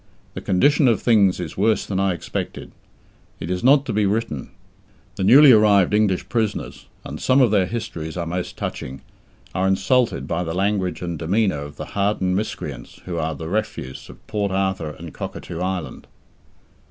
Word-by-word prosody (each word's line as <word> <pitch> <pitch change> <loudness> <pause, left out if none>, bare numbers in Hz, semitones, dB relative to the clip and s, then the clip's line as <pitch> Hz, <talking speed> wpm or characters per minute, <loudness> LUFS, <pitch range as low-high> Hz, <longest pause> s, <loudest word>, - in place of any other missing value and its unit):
The - - -6
condition 140 - +3
of 115 -3 +3
things 100 -6 +3
is 85 -4 -5
worse 110 +3 +2
than 95 -2 -2
I 95 -2 +1
expected. - - -5 0.7
It 80 - -5
is 90 0 -2
not 140 +2 +5
to - - -3
be 105 -1 +2
written. 100 - -2 0.7
The - - -3
newly 135 +8 +8
arrived 105 -4 +5
English 105 -3 +1
prisoners 110 -3 -3 0.2
and - - -7
some 130 +1 +3
of 125 -5 +4
their 95 -4 +3
histories 90 -9 -5
are 85 - -2
most 90 +2 -4
touching 65 +1 -5 0.5
are 95 +1 +1
insulted 95 - +1
by 85 +2 -1
the 80 0 -4
language 95 -3 -1
and 85 -2 -4
demeanour 95 0 +1
of 75 +1 -8
the - - -6
hardened 100 -2 0
miscreants 75 - -5
who 85 -2 -3
are 80 0 -2
the 80 +2 -7
refuse 90 -9 -4
of - - -14
Port 100 -2 -2
Arthur 95 -4 -1
and 80 0 -10
Cockatoo 85 - -6
Island. 90 -2 -4
95 Hz, 175 wpm, -22 LUFS, 85-110 Hz, 0.7 s, newly